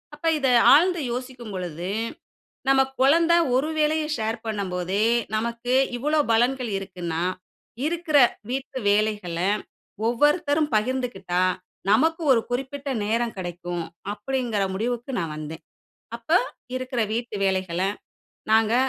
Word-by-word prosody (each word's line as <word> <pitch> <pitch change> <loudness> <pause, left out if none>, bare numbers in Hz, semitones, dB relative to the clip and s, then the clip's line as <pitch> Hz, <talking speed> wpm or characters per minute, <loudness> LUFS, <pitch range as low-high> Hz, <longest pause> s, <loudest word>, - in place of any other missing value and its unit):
அப்ப 300 - -10
இத 270 - +1 0.3
ஆழ்ந்து 350 +3 +4
யோசிக்கும் 245 -3 -6
பொழுது, 175 -1 -4 0.8
நம்ம 270 0 +6 0.2
கொழந்த 325 +6 +5 0.2
ஒரு 275 +4 +1
வேலைய 310 +1 +2
ஷேர் 225 0 -2
பண்ணும்போதே, 195 -1 -1 0.3
நமக்கு 235 +2 -1 0.2
இவ்வளவு 300 +2 +1
பலன்கள் 245 +1 +2
இருக்குன்னா, 175 -4 -4 0.6
இருக்குற 330 -2 +1 0.3
வீட்டு 265 +1 -3
வேலைகள, 205 -5 0 0.7
ஒவ்வொருத்தரும் 295 +4 +2
பகிர்ந்துக்கிட்டா, 215 -6 -1 0.5
நமக்கு 320 +10 +3
ஒரு 235 - +4
குறிப்பிட்ட 270 +3 -3 0.2
நேரம் 230 +2 -1
கிடைக்கும். 175 -1 -4 0.3
அப்படீங்கிற 230 -1 -2
முடிவுக்கு 240 +5 -2
நான் 165 -4 -3
வந்தேன். 155 +1 -7 0.5
அப்ப 235 +6 -9 0.4
இருக்குற 255 -2 -2
வீட்டு 235 -1 -3
வேலைகள 185 -2 0 0.7
நாங்க 220 0 +4
235 Hz, 110 wpm, -24 LUFS, 195-270 Hz, 0.8 s, நம்ம